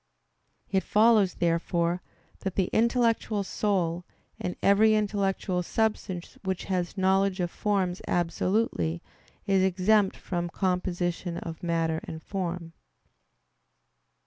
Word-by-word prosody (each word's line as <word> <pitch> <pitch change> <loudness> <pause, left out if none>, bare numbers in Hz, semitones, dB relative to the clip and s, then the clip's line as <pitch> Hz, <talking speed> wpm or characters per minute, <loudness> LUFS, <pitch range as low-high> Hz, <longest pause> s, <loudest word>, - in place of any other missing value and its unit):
It 190 -1 +3
follows, 215 -3 +4
therefore, 170 +1 0 0.4
that 190 -2 -4
the 190 -2 0
intellectual 230 -3 +2
soul, 180 -4 -1 0.4
and 180 - -3
every 215 +2 +5
intellectual 200 -3 0
substance 195 -2 -2
which 190 -1 -2
has 180 0 -2
knowledge 190 0 +2
of 175 -1 -1
forms 190 -3 -1
absolutely, 170 - 0 0.4
is 195 -1 +3
exempt 190 +2 +3
from 175 -1 -3
composition 180 -1 -1
of 165 +1 -7
matter 165 -2 0
and 160 -1 -8
form. 175 -3 -4
185 Hz, 105 wpm, -27 LUFS, 175-200 Hz, 0.4 s, every